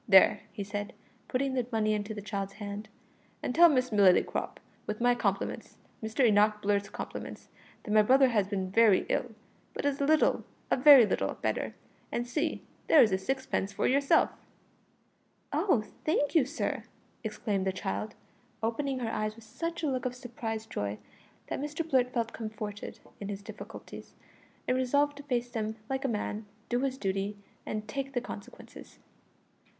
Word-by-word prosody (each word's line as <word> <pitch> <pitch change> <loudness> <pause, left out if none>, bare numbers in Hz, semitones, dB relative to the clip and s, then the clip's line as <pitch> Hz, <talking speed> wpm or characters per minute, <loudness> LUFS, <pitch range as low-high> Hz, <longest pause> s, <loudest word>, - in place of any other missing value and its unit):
"There," 195 0 +7
he 200 - -5
said, 205 +1 -4 0.3
putting 265 +1 0
the 250 -3 0
money 215 -1 +2
into 210 +1 -3
the 205 - -6
child's 195 -1 -3
hand, 205 +1 -6 0.5
"and - - -1
tell 340 +3 +8
Miss 255 -4 +1
Lillycrop, 200 -4 +3 0.3
with 210 0 -3
my 245 +1 +4
compliments 200 -4 -2 0.2
Mr 220 +4 +1
Enoch 210 -1 +4
Blurt's 200 -1 0
compliments - - -7 0.3
that - - -5
my 215 0 +7
brother 260 +4 +5
has 210 -5 +2
been 190 -2 -2
very 220 -2 +5
ill, 235 -3 -1 0.4
but - - -3
is 285 -1 0
a - - +3
little 310 0 +3 0.3
a - - +6
very 270 -2 +9
little - - -1
better; - - -1 0.4
and 240 - -1
see, 305 +6 -2 0.2
there 315 - +8
is 215 - +2
a 190 - +2
sixpence 200 -2 -2
for - - -1
yourself." 280 +5 +4 1.2
"Oh, 320 - +2 0.2
thank 290 -2 +1
you, 320 -7 +5
sir!" 295 +5 -2 0.4
exclaimed 210 -3 -2
the - - +2
child, 195 +3 -4 0.5
opening 265 +4 -1
her 225 -2 -1
eyes 215 -1 -2
with 230 -1 -14
such 335 +7 -4
a - - +2
look 255 -2 -1
of 250 - -5
surprised 230 -4 -5
joy 100 0 -2 0.5
that - - -4
Mr 300 +3 -3
Blurt 255 -4 +2
felt 230 -2 -1
comforted 215 -2 -6 0.2
in 200 - -5
his 200 0 -5
difficulties, - - -10 0.5
and 255 - +2
resolved 285 +3 +2
to 285 - -9
face 245 -3 -1
them 220 -1 -2 0.2
like 265 0 -1
a - - +1
man, 210 -2 -3 0.2
do 245 - +1
his 265 0 -1
duty, 195 -1 -2 0.3
and 215 0 -3
take 275 +4 -4
the 245 - +1
consequences. 205 - -10
225 Hz, 170 wpm, -30 LUFS, 205-265 Hz, 1.2 s, very